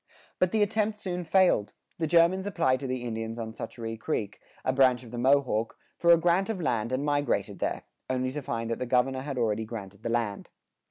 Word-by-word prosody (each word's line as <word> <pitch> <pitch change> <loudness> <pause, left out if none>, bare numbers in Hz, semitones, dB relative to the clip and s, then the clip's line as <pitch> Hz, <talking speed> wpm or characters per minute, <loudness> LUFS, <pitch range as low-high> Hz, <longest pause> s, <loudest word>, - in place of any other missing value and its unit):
[82:1] - - -54 0.3
But 185 -1 +3
the 220 - +2
attempt 215 0 0
soon 180 -3 -4
failed; 175 - +3 0.3
the 160 - 0
Germans 170 +4 +4
applied 130 -10 +1
to 135 - -4
the 130 -1 -3
Indians 115 -1 -4
on 110 -1 -5
Schoharie 115 -1 -6
Creek, 105 -2 -3 0.3
a 130 - +2
branch 130 -2 +4
of 115 - -12
the 120 - -5
Mohawk, 130 -4 +2 0.2
for 170 - +2
a 170 - +8
grant 175 +4 +2
of 220 -4 -2
land 120 -7 -1
and 130 +3 -1
migrated 145 -2 0
there, - - -2 0.3
only 130 0 0
to 150 +2 -4
find 115 -3 -3
that 115 - -2
the 125 - -3
governor 130 +2 +2
had 140 -1 -5
already 110 -2 +1
granted 105 -3 -8
the 115 - -3
land. 115 -4 -2
130 Hz, 215 wpm, -28 LUFS, 115-170 Hz, 0.3 s, a